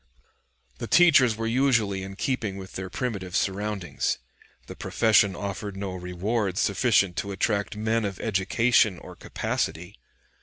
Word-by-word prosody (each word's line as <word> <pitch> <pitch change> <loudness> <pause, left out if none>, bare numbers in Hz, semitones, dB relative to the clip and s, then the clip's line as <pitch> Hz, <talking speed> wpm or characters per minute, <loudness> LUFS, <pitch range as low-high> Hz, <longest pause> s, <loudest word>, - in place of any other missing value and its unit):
The - - -4
teachers 140 -10 +5
were 115 +1 -4
usually 115 -5 +1
in 95 0 -7
keeping 105 -4 -2
with 95 -1 -9
their 95 -1 -5
primitive 100 -6 -4
surroundings. 100 -1 -1 0.5
The - - -9
profession 110 -4 +3
offered 100 +1 -5
no 95 -1 -4
rewards 95 +3 -2
sufficient 100 -3 +2
to 100 - -3
attract 100 +1 -1
men 110 +1 0
of 100 -2 -4
education 110 +1 +2
or - - -11
capacity. 85 +5 -4
100 Hz, 130 wpm, -26 LUFS, 95-115 Hz, 0.5 s, teachers